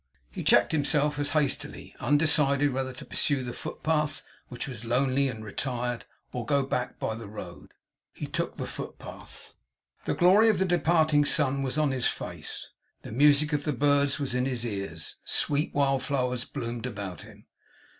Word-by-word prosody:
He -, -, -6 dB
checked -, -, +4 dB
himself 145 Hz, -1 st, +1 dB
as 145 Hz, 0 st, 0 dB
hastily; 145 Hz, -3 st, -2 dB
undecided 145 Hz, -1 st, +3 dB
whether 130 Hz, 0 st, -2 dB
to 125 Hz, -, -11 dB
pursue 140 Hz, -3 st, +1 dB
the 120 Hz, -1 st, -5 dB
footpath, 155 Hz, -1 st, -2 dB, 0.2 s
which 125 Hz, -1 st, -5 dB
was 120 Hz, -4 st, -6 dB
lonely 130 Hz, +3 st, +1 dB
and 110 Hz, -4 st, -6 dB
retired, 120 Hz, +2 st, -3 dB, 0.3 s
or 125 Hz, -, -4 dB
to -, -, -10 dB
go 140 Hz, -1 st, +3 dB
back 125 Hz, -2 st, -3 dB
by -, -, -2 dB
the 115 Hz, -1 st, -8 dB
road. 95 Hz, -4 st, -10 dB, 0.4 s
He -, -, -6 dB
took -, -, -3 dB
the -, -, -3 dB
footpath. -, -, -8 dB, 0.5 s
The -, -, 0 dB
glory 195 Hz, +6 st, +5 dB
of 215 Hz, -, +2 dB
the 190 Hz, -, +2 dB
departing 160 Hz, -4 st, +3 dB
sun 140 Hz, -2 st, +4 dB
was 135 Hz, +1 st, -1 dB
on 150 Hz, -2 st, +2 dB
his 130 Hz, -2 st, 0 dB
face. -, -, -5 dB, 0.3 s
The -, -, -9 dB
music 145 Hz, +4 st, +4 dB
of 145 Hz, -1 st, 0 dB
the 150 Hz, -, -1 dB
birds 140 Hz, +1 st, +2 dB
was 140 Hz, -4 st, 0 dB
in 125 Hz, 0 st, 0 dB
his 125 Hz, -3 st, 0 dB
ears. 100 Hz, -7 st, -4 dB
Sweet 145 Hz, +2 st, +1 dB
wild 135 Hz, -2 st, +2 dB
flowers 125 Hz, -4 st, -1 dB
bloomed 120 Hz, +1 st, -5 dB
about 100 Hz, -6 st, -6 dB
him. -, -, -15 dB
135 Hz, 175 wpm, -27 LUFS, 120-145 Hz, 0.5 s, glory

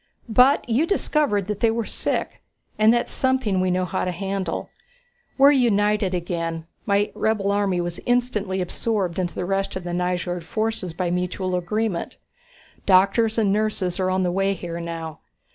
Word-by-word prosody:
But 250 Hz, +6 st, +4 dB
you 250 Hz, +8 st, +2 dB
discovered 295 Hz, -, +1 dB
that 210 Hz, 0 st, -4 dB
they 230 Hz, -, +3 dB
were 225 Hz, 0 st, -1 dB
sick, -, -, -2 dB, 0.4 s
and 215 Hz, +1 st, +6 dB
that's 240 Hz, 0 st, 0 dB
something 260 Hz, -8 st, +1 dB
we 185 Hz, -, +1 dB
know 180 Hz, 0 st, +1 dB
how -, -, -2 dB
to 185 Hz, -, -1 dB
handle. 195 Hz, +1 st, -3 dB, 0.7 s
We're 280 Hz, +1 st, +7 dB
united 210 Hz, -7 st, +2 dB
again; 165 Hz, -2 st, -3 dB, 0.2 s
my 200 Hz, 0 st, +2 dB
rebel 210 Hz, -2 st, 0 dB
army 200 Hz, -3 st, +1 dB
was 175 Hz, 0 st, -4 dB
instantly 215 Hz, -6 st, 0 dB
absorbed 190 Hz, -1 st, -2 dB
into 175 Hz, -2 st, -2 dB
the 180 Hz, -, -2 dB
rest 195 Hz, +1 st, -1 dB
of 185 Hz, -, -4 dB
the 175 Hz, 0 st, -4 dB
Nyjord 180 Hz, 0 st, -1 dB
forces 215 Hz, -2 st, -2 dB
by 175 Hz, 0 st, -2 dB
mutual 180 Hz, +1 st, -1 dB
agreement. 180 Hz, +1 st, -2 dB, 0.7 s
Doctors 200 Hz, +4 st, +4 dB
and 205 Hz, -3 st, +3 dB
nurses 205 Hz, -4 st, -1 dB
are 185 Hz, 0 st, +1 dB
on 185 Hz, 0 st, +1 dB
the 180 Hz, -, +1 dB
way 195 Hz, +2 st, +1 dB
here 170 Hz, -2 st, -6 dB
now. 165 Hz, -2 st, -6 dB
195 Hz, 165 wpm, -23 LUFS, 180-220 Hz, 0.7 s, We're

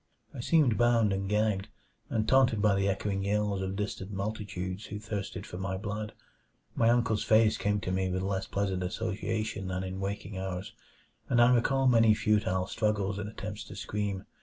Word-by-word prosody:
I -, -, -8 dB
seemed 130 Hz, -3 st, +3 dB
bound 115 Hz, -4 st, +4 dB
and 95 Hz, 0 st, -2 dB
gagged, 105 Hz, -1 st, +1 dB, 0.4 s
and 110 Hz, -1 st, 0 dB
taunted 130 Hz, -4 st, +4 dB
by 105 Hz, -1 st, +4 dB
the 100 Hz, 0 st, +1 dB
echoing 100 Hz, 0 st, -1 dB
yells 100 Hz, -1 st, 0 dB
of 95 Hz, 0 st, -3 dB
distant 100 Hz, -2 st, -4 dB
multitudes 100 Hz, -1 st, -4 dB
who 105 Hz, -, -5 dB
thirsted 105 Hz, -2 st, -5 dB
for 90 Hz, -, -7 dB
my 95 Hz, 0 st, -2 dB
blood. 105 Hz, +1 st, -4 dB, 0.6 s
My 115 Hz, -, +3 dB
uncle's 115 Hz, -3 st, +2 dB
face 110 Hz, 0 st, +4 dB
came 105 Hz, 0 st, 0 dB
to 90 Hz, -, -3 dB
me 95 Hz, 0 st, 0 dB
with 95 Hz, +1 st, -1 dB
less 95 Hz, 0 st, -2 dB
pleasant 95 Hz, -2 st, -1 dB
association 110 Hz, +1 st, -2 dB
than 90 Hz, 0 st, -2 dB
in 95 Hz, 0 st, -5 dB
waking 100 Hz, 0 st, -4 dB
hours, 95 Hz, 0 st, -4 dB, 0.6 s
and 120 Hz, -, +3 dB
I 120 Hz, +1 st, +7 dB
recall 135 Hz, +3 st, +2 dB
many 115 Hz, -3 st, +5 dB
futile 105 Hz, -3 st, +1 dB
struggles 100 Hz, -2 st, -1 dB
and 105 Hz, 0 st, -4 dB
attempts 105 Hz, -1 st, -6 dB
to -, -, -10 dB
scream. 100 Hz, -1 st, -3 dB
105 Hz, 180 wpm, -30 LUFS, 95-110 Hz, 0.6 s, I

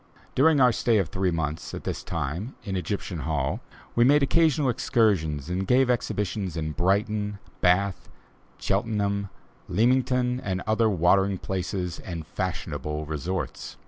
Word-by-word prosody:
During 150 Hz, +2 st, +4 dB
our 125 Hz, -2 st, +6 dB
stay 115 Hz, -1 st, +2 dB
of 95 Hz, -7 st, +1 dB
three 95 Hz, +2 st, 0 dB
months, 80 Hz, -2 st, -3 dB
at -, -, -7 dB
this -, -, -3 dB
time, 85 Hz, -, -4 dB
in 95 Hz, -, -3 dB
Egyptian 90 Hz, -1 st, -3 dB
Hall, 75 Hz, -, -1 dB, 0.4 s
we 120 Hz, -, +5 dB
made 145 Hz, +3 st, +5 dB
occasional 155 Hz, -1 st, +3 dB
excursions 90 Hz, -, +1 dB
and 90 Hz, +2 st, -2 dB
gave 125 Hz, 0 st, +4 dB
exhibitions 100 Hz, -6 st, -2 dB
at 80 Hz, -1 st, -3 dB
Brighton, 105 Hz, +2 st, 0 dB, 0.2 s
Bath, 90 Hz, +1 st, +2 dB, 0.5 s
Cheltenham, 100 Hz, -1 st, 0 dB, 0.4 s
Leamington 125 Hz, +3 st, +2 dB
and 95 Hz, -5 st, -3 dB
other 110 Hz, +1 st, +3 dB
watering 95 Hz, +1 st, +3 dB
places 90 Hz, -1 st, -3 dB
and 85 Hz, -4 st, -6 dB
fashionable 75 Hz, +1 st, -3 dB
resorts. 80 Hz, +5 st, -4 dB
95 Hz, 135 wpm, -26 LUFS, 85-115 Hz, 0.5 s, our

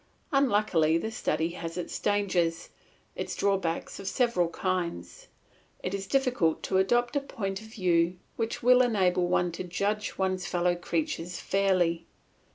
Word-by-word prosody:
Unluckily 205 Hz, -, +3 dB
this 220 Hz, +6 st, -4 dB
study 160 Hz, +2 st, 0 dB
has 170 Hz, 0 st, -6 dB
its 180 Hz, -, -4 dB
dangers, 185 Hz, -5 st, 0 dB, 0.5 s
its -, -, -4 dB
drawbacks 195 Hz, -4 st, -1 dB
of 195 Hz, -, -7 dB
several 215 Hz, -8 st, +1 dB
kinds. 175 Hz, -, -3 dB, 0.6 s
It 185 Hz, -, -2 dB
is 195 Hz, -1 st, -3 dB
difficult 250 Hz, -, +1 dB
to 190 Hz, -, +1 dB
adopt 240 Hz, +7 st, +2 dB
a -, -, +4 dB
point 195 Hz, -7 st, -4 dB
of 220 Hz, -, -11 dB
view 180 Hz, -4 st, +1 dB, 0.2 s
which 225 Hz, 0 st, -3 dB
will 250 Hz, +1 st, +7 dB
enable 185 Hz, -7 st, +2 dB
one 180 Hz, 0 st, +1 dB
to 170 Hz, -, -5 dB
judge 200 Hz, +4 st, -2 dB
one's 185 Hz, -1 st, -1 dB
fellow 175 Hz, 0 st, +1 dB
creatures 175 Hz, -, -3 dB
fairly. 180 Hz, -4 st, +1 dB
185 Hz, 145 wpm, -28 LUFS, 175-215 Hz, 0.6 s, will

